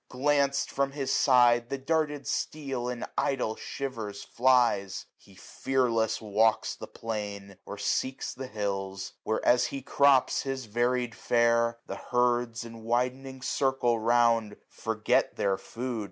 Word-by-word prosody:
Glanc'd 140 +1 +1
from 140 0 -1
his 135 -2 -2
side, 120 -2 +5
710 140 - -2
The 135 - -23
darted 150 -3 0
steel 135 -4 -3
in 125 -1 -4
idle 125 -5 0
shivers 110 -7 -5
flies: 120 -6 +2
He 100 - -20
fearless 115 -2 0
walks 110 +1 +1
the - - -9
plain, 100 -3 -6
or 100 - -6
seeks 130 +5 -2
the 130 0 -7
hills; 100 -4 -4
Where, 110 - -2
as 125 0 +4
he 135 +1 -6
crops 140 -1 +3
his 135 -2 -4
varied 120 +2 0
fare, 115 +3 +2
the - - -6
herds. 120 -1 0
In 115 -1 -10
widening 125 +3 -2
circle 130 -4 +1
round, 115 -2 +2
forget 110 -1 0
their 100 -1 +1
food. 120 +3 -5
120 Hz, 140 wpm, -28 LUFS, 110-130 Hz, -, side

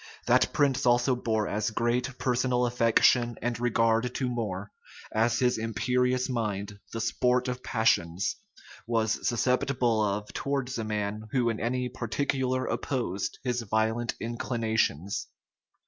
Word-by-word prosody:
That - - +4
prince 140 -2 +2
also 120 +2 +4
bore 110 -3 0
as 105 +1 -1
great 120 +3 -1
personal 125 0 +1
affection 120 0 +3
and 120 0 -2
regard 115 0 +1
to 130 - 0
More, 105 -5 -3 0.4
as 115 +1 +2
his 125 -2 +2
imperious 125 +4 +1
mind, 105 -5 -3
the 115 - -4
sport 125 +2 +1
of 125 0 -3
passions, 95 - +1 0.5
was 110 -2 0
susceptible 125 -1 +1
of 105 0 -2
towards 135 -3 -2
a - - -1
man 105 0 -3
who 120 -3 +2
in 110 - -5
any 125 +2 -1
particular 130 +1 -1
opposed 120 -7 -2
his 125 -2 -1
violent 110 +2 0
inclinations. 110 - -1
120 Hz, 130 wpm, -28 LUFS, 110-125 Hz, 0.5 s, That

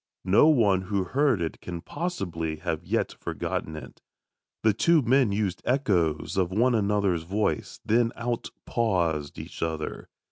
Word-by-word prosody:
No 100 +10 +6
one 105 -11 +4
who 95 +1 -1
heard 130 +1 +1
it 80 - -5
can 85 -1 -6
possibly 85 - -3
have 75 - -3
yet - - -1
forgotten 80 - -3
it. 75 - -10 0.6
The 110 -1 +4
two 165 - +3
men 125 -2 +3
used 100 -2 -1
echoes 95 - +1
of 90 -2 +2
one 120 +6 +2
another's 100 -5 +1
voice, 100 +6 -2
then 115 +1 +3
outpaused 95 -9 -1
each - - -8
other. 80 -2 -3
100 Hz, 140 wpm, -27 LUFS, 85-120 Hz, 0.6 s, No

